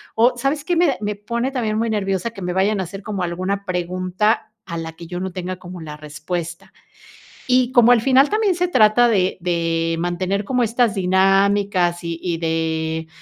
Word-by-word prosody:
o, 240 +3 +4
¿sabes 275 +4 -1
qué? 350 +2 0
Me 345 +1 +4
da 270 - 0
me 210 0 -2
pone 235 +5 -3
también 220 -5 -1
muy 230 0 0
nerviosa 195 0 -1
que 200 -4 -11
me 180 0 -2
vayan 195 +2 +1
a - - 0
hacer 195 +3 -8
como 200 -3 -4
alguna 185 +3 -3
pregunta 185 +4 -1
a 170 -3 -5
la 160 0 -5
que 170 0 -11
yo 175 +1 -5
no 190 0 -4
tenga 185 +1 -5
como 180 -1 -10
la 150 -1 -8
respuesta. 160 +3 -6 0.8
Y 255 0 +3
como 240 0 +6
al 235 -3 +5
final, 270 +2 +4
también 420 -4 +1
se 360 +1 0
trata 240 -5 +4
de 190 -5 +1
de 165 -1 -1
mantener 185 +3 -1
como 250 0 +1
estas 230 -1 +1
dinámicas, 190 -1 +2
y 170 0 -4
y 170 -2 -2
de, 160 0 -2
190 Hz, 195 wpm, -20 LUFS, 175-230 Hz, 0.8 s, como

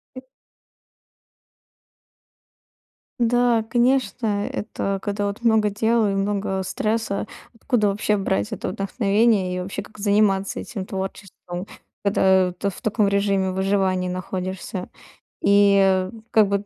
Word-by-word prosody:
И 255 - -7 3.0
Да, 240 -1 +3
конечно. 240 -4 +1
Это 195 -2 -3
когда 205 0 -2
вот 200 +4 -6
много 220 -2 +3
дел 220 +2 +2
и 200 - 0
много 195 -1 -1
стресса, 215 +2 -2 0.3
откуда 230 -3 +1
вообще 210 +1 0
брать 100 - -1
это - - -4
вдохновение? 200 -1 +1
И - - -2
вообще, 195 +2 -5
как 215 - -17
заниматься 200 -1 +2
этим 200 -7 -6
творчеством, 190 -1 -6 0.4
когда 190 -2 +3
ты 200 +3 -2
в 190 - -10
таком 215 -1 +1
режиме 200 -1 +1
выживания 190 -1 0
находишься 185 0 -5 0.5
и, 200 0 +5
э, 190 0 +2 0.2
как 215 -2 +5
бы 200 0 -1
200 Hz, 120 wpm, -23 LUFS, 190-215 Hz, 3.0 s, и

